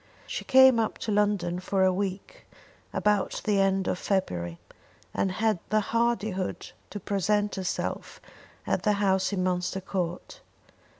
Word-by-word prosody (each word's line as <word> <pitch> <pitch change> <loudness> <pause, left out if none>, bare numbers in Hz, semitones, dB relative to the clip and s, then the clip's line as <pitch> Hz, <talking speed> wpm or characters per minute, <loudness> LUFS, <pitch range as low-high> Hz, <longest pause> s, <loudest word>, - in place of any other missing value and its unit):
She - - -5
came 260 -2 +6
up 220 - -1
to 220 - -1
London 205 -4 +1
for 190 +1 0
a 185 0 +4
week 195 0 -5 0.4
about 210 -2 +1
the 205 -2 +2
end 195 -1 +2
of 180 - -1
February, 85 - -1 0.6
and 190 -1 0
had 215 -1 +1
the 215 - +3
hardihood 220 -5 -1 0.2
to 205 - -6
present 205 +2 0
herself 190 -2 -4 0.5
at - - 0
the 210 - +2
house 190 -1 +1
in 190 -2 -1
Munster 180 +1 -1
Court. 185 - -4
195 Hz, 140 wpm, -27 LUFS, 185-210 Hz, 0.6 s, came